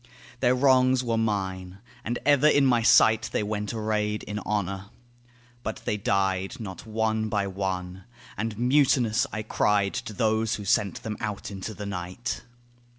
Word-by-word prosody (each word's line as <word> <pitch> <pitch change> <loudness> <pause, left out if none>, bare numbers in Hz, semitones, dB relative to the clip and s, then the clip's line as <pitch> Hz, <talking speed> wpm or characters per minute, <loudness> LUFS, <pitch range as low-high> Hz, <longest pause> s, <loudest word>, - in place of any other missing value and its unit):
Their 125 0 +3
wrongs 130 -1 +4
were 115 -2 0
mine; 95 -4 -2 0.3
and 120 +2 -2
ever 145 0 +5
in 145 -2 +5
my 120 -3 +3
sight 110 -1 +5
They - - 0
went 105 0 -3
arrayed 105 -1 -1
in 105 0 -4
honour. 100 -2 -2 0.8
But 110 - -5
they - - 0
died, 95 -2 0
Not 100 -1 -8
one 110 0 0
by 105 -2 0
one: 95 -1 -4 0.3
and 105 0 -3
mutinous 125 -3 +3
I 110 - -4
cried 105 -2 +1
To - - -4
those 110 +1 +1
who 105 - -7
sent 100 -1 +1
them 105 -1 -4
out 105 -2 -4
into 100 +2 -6
the 105 - -6
night. 90 +2 -4
105 Hz, 155 wpm, -26 LUFS, 100-115 Hz, 0.8 s, ever